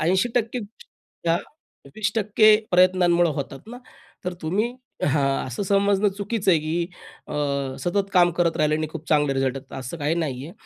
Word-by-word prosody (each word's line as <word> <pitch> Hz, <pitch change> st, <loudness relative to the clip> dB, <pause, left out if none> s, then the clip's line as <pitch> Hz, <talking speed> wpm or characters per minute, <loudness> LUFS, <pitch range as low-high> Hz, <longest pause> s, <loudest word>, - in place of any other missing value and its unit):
80% 225 Hz, +7 st, +1 dB, 0.7 s
या 165 Hz, -, +4 dB, 0.6 s
20% 215 Hz, 0 st, +4 dB
प्रयत्नांमुळे 180 Hz, -2 st, +4 dB
होतात 135 Hz, -1 st, -5 dB
ना. 245 Hz, +1 st, -8 dB, 0.5 s
तर 180 Hz, -1 st, -3 dB
तुम्ही 210 Hz, +10 st, -1 dB, 0.3 s
हां 140 Hz, -2 st, +1 dB
असं 130 Hz, +9 st, -4 dB
समजणं 200 Hz, +1 st, +2 dB
चुकीचं 205 Hz, -1 st, 0 dB
आहे 170 Hz, -, +5 dB
की 165 Hz, +2 st, -1 dB, 0.4 s
अ, -, -, -6 dB, 0.5 s
सतत 195 Hz, +2 st, -1 dB
काम 175 Hz, -2 st, +5 dB
करत 170 Hz, -1 st, +1 dB
राहिले 155 Hz, 0 st, +2 dB
आणि 155 Hz, -, -2 dB
खूप 160 Hz, -1 st, -9 dB
चांगले 145 Hz, -3 st, +3 dB
रिझल्ट 135 Hz, 0 st, 0 dB
येतात 130 Hz, -, -8 dB
असं 130 Hz, +6 st, -6 dB
काही 150 Hz, +2 st, 0 dB
नाहीये. 150 Hz, -2 st, -3 dB
175 Hz, 150 wpm, -24 LUFS, 150-200 Hz, 0.7 s, आहे